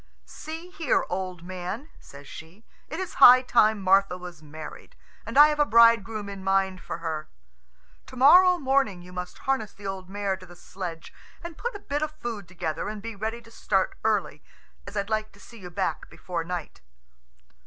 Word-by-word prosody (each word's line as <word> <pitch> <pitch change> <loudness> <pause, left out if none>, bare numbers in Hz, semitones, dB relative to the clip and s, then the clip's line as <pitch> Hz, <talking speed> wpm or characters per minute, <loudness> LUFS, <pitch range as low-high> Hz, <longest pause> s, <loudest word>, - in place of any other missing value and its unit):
"See 325 +3 -9
here, 320 -7 0
old 180 -2 -4
man," 185 - -6
says 140 0 -14
she, 170 +8 -12 0.2
"it - - -5
is 375 -2 -4
high 255 0 +10
time 220 -4 +3
Martha 195 -1 +3
was 180 -3 -10
married, 155 0 -10 0.3
and - - -3
I 295 +1 +9
have 300 0 -2
a - - +6
bridegroom 225 -2 +4
in 200 -1 -8
mind 195 -1 +1
for - - -6
her. 160 -2 -4 0.8
To - - -11
morrow 360 +8 +7
morning 265 - 0
you 180 +1 -13
must 180 0 -6
harness 265 -6 -2
the 205 - -14
old 190 -1 -5
mare 200 -1 -2
to 185 - -13
the 175 - -14
sledge, 175 -2 -8 0.3
and 340 -1 -7
put 465 +5 -4
a - - -6
bit 290 -6 -3
of 310 - 0
food 230 - -6
together 170 +1 -4
and 215 0 -6
be 225 +1 -7
ready 220 +3 -4
to 230 - -17
start 195 -4 0
early, 205 -9 0 0.5
as 205 - -7
I'd 200 +2 -2
like 215 0 -1
to 200 - -19
see 230 +2 -14
you 180 -2 -9
back 185 +2 -3
before 170 -2 -5
night." 175 -2 -6
200 Hz, 190 wpm, -26 LUFS, 180-245 Hz, 0.8 s, high